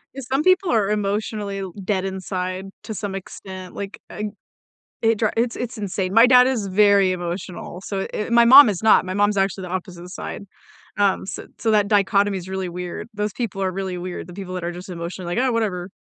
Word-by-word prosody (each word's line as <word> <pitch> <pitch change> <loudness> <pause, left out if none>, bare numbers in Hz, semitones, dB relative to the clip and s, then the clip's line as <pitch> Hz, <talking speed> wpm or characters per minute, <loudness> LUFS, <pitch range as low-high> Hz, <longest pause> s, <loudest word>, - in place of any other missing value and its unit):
'Cause 270 -3 -7
some 275 +3 +2
people 370 0 +3
are 210 -3 +2
emotionally 205 -1 -2 0.2
dead 195 -1 0
inside 185 0 -4 0.2
to 220 - -5
some 200 -1 -4
extent. 185 -1 -9
Like, 200 0 -6
ug 210 0 -4 0.7
it 225 -1 +3
dri 220 -2 +2
it's 235 0 +1
it's 240 -1 -5
insane. 190 -2 -2
My 230 +2 +8
dad 250 0 +7
is 225 -7 -1
very 200 -1 +4
emotional. 175 0 -5
So, 195 -1 -3
eh, 210 - -3
my 235 0 +5
mom 260 -1 +10
is 195 -1 -3
not. 220 - +5
My 185 - -4
mom's 205 0 +2
actually 195 0 0
the 180 - -6
opposite 180 -1 -6
side. 200 - -6 0.5
Um, 200 -2 +2
so - - -7
so 225 -1 +1
that 205 -1 +3
dichotomy 200 -1 +2
is 185 0 -8
really 190 -1 -3
weird. 180 +5 -6
Those 210 -1 -2
people 210 -5 -4
are 190 -1 0
really 190 -1 -4
weird. 180 -1 -6
The 180 - -10
people 185 -1 -7
that 180 - -4
are 175 - -2
just 180 +2 -9
emotionally, 175 0 -5
like, 250 - +2
"Oh, 260 - +2
whatever." 195 -6 -1
195 Hz, 210 wpm, -22 LUFS, 185-215 Hz, 0.7 s, mom